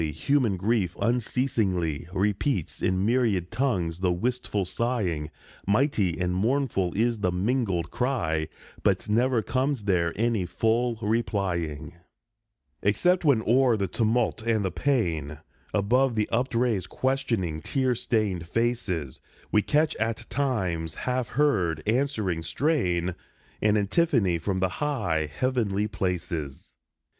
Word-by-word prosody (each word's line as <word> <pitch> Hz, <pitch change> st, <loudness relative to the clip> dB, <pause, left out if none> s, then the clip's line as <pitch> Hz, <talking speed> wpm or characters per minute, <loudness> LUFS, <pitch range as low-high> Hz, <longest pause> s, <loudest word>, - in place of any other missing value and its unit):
human 120 Hz, -, +1 dB
grief 100 Hz, -2 st, 0 dB
unceasingly 110 Hz, -, 0 dB
Repeats 100 Hz, -, -1 dB
in 95 Hz, +1 st, +1 dB
myriad 110 Hz, -7 st, +1 dB
tongues 90 Hz, -11 st, 0 dB
the 90 Hz, -1 st, +2 dB
wistful 105 Hz, +1 st, -1 dB
sighing. 90 Hz, -7 st, -1 dB, 0.4 s
Mighty 100 Hz, -, +2 dB
and 90 Hz, 0 st, 0 dB
mournful 110 Hz, -2 st, +1 dB
is 115 Hz, +1 st, +1 dB
the 90 Hz, -3 st, +1 dB
mingled 95 Hz, -3 st, 0 dB
cry, 80 Hz, -, 0 dB, 0.3 s
But -, -, +1 dB
never 120 Hz, +2 st, +2 dB
comes 130 Hz, -2 st, -1 dB
there 90 Hz, -4 st, +1 dB
any 110 Hz, -4 st, 0 dB
full 115 Hz, +5 st, +1 dB
replying, 90 Hz, -8 st, -1 dB, 0.8 s
Except 175 Hz, -, +2 dB
when, 135 Hz, -8 st, +3 dB
o'er 125 Hz, 0 st, +4 dB
the 100 Hz, -2 st, -1 dB
tumult 115 Hz, +4 st, +1 dB
and 110 Hz, -3 st, 0 dB
the 95 Hz, -, -1 dB
pain, 85 Hz, -, 0 dB, 0.3 s
Above 120 Hz, +5 st, +2 dB
the 105 Hz, -1 st, +1 dB
upraised, 115 Hz, -5 st, 0 dB
questioning, 115 Hz, -, -1 dB
tear 130 Hz, -, 0 dB
stained 105 Hz, -8 st, -1 dB
faces, 100 Hz, -, -2 dB, 0.3 s
We 105 Hz, -, +4 dB
catch 150 Hz, +6 st, +1 dB
at 110 Hz, 0 st, -2 dB
times 95 Hz, -, -1 dB
a -, -, -9 dB
half 125 Hz, -2 st, -1 dB
heard, 95 Hz, -, +1 dB
answering 110 Hz, -, 0 dB
strain, 90 Hz, -, 0 dB, 0.5 s
An 105 Hz, 0 st, +3 dB
antiphone 105 Hz, -, +2 dB
from 95 Hz, +3 st, -2 dB
the 95 Hz, 0 st, +1 dB
high, 90 Hz, -, -1 dB
heavenly 105 Hz, -, 0 dB
places. 85 Hz, -8 st, -4 dB
105 Hz, 120 wpm, -26 LUFS, 90-125 Hz, 0.8 s, o'er